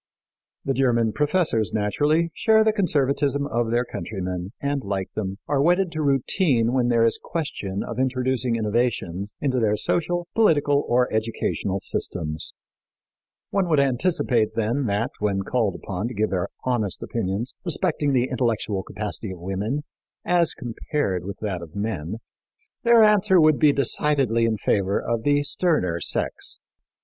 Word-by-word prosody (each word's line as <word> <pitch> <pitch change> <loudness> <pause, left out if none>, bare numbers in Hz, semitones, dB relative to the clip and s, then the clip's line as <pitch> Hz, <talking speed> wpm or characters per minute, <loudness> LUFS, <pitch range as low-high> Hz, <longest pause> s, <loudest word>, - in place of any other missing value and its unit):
The 135 - +1
German 120 -4 +2
professors, 150 - +1
naturally, 150 +11 +1
share 220 +3 +4
the 220 0 +2
conservatism 145 - +1
of 120 -4 -1
their 120 +2 +1
countrymen, 90 -5 -5
and, 140 -1 -2
like 95 -1 -3
them, 95 -2 -3
are 140 -2 +1
wedded 175 +3 +3
to 155 -1 -3
routine 135 - +2
when 125 -2 +2
there 115 -1 +3
is 115 - +1
question 100 - -4
of 115 +1 -6
introducing 130 -1 0
innovations 105 -4 -1
into 130 -3 0
their 105 -2 +2
social, 175 +7 -1
political 145 -9 +3
or 125 +1 +3
educational 110 -3 -1
systems. 80 -4 -3 1.0
One 190 -3 +1
would 155 -3 +3
anticipate, 130 -4 +1
then, 115 +4 0
that, 105 +4 0
when 100 -2 0
called 115 -2 0
upon 100 +3 -4
to 125 - -7
give 110 +1 0
their 90 -2 -1
honest 120 -7 -1
opinions 110 +2 -3
respecting 160 -4 0
the 130 -1 +2
intellectual 115 -6 -1
capacity 105 +2 -5
of 95 - -7
women, 100 +10 -3 0.4
as 175 -2 +2
compared 115 - -3
with 100 -1 -6
that 95 -5 -3
of 85 -1 -11
men, 100 -4 -3 0.7
their 235 -2 +6
answer 205 -3 +5
would 155 -2 +5
be 150 - +6
decidedly 135 -4 +1
in 110 -1 0
favor 100 -1 +1
of 115 -1 -2
the 145 +3 +2
sterner 145 - +1
sex. - - -2
120 Hz, 150 wpm, -24 LUFS, 105-145 Hz, 1.0 s, their